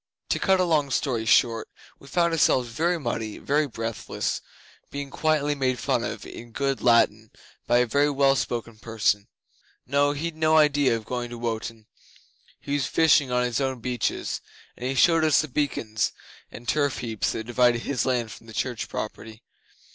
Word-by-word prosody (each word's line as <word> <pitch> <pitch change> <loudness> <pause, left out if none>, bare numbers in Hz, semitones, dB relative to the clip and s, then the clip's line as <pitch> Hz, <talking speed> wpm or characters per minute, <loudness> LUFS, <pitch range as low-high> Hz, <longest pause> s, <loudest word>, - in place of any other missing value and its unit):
To - - +1
cut 190 -1 +3
a - - +4
long 155 -5 +2
story 125 -3 -1
short, 115 +1 +3 0.3
we 140 - -15
found 170 +1 +1
ourselves 130 -6 +3
very 170 +8 0
muddy, 115 -5 -3
very 150 +1 +1
breathless, 115 -3 -3 0.5
being 140 -1 -6
quietly 150 -2 +1
made 130 -3 0
fun - - 0
of - - -5
in 120 0 -10
good 135 +1 -1
Latin 110 -2 +3 0.4
by 120 - +4
a 125 - +4
very 140 +5 +2
well 140 -1 +3
spoken 115 -4 -3
person. 110 -3 0 0.6
No 145 +2 +2
he'd 160 +3 -4
no 160 0 +3
idea 145 -5 +4
of 110 - -10
going 125 0 -3
to 120 - -7
Wotan. 115 -1 -4 0.7
He 140 - -5
was 145 -2 0
fishing 150 -5 +4
on 125 0 +2
his 125 +2 -1
own 130 -2 -1
beaches, 125 +1 -2 0.3
and 125 +1 -4
he 135 - -2
showed 165 +4 +4
us 155 -2 +4
the 155 - -5
beacons 120 -6 -1 0.4
and 120 - -11
turf 145 0 +1
heaps 115 -3 -2
that 110 - -4
divided 120 0 +2
his 130 -4 -1
land 120 -4 0
from 115 - -12
the 110 - -11
church 120 0 -3
property. 110 +1 -6
125 Hz, 175 wpm, -25 LUFS, 115-145 Hz, 0.7 s, a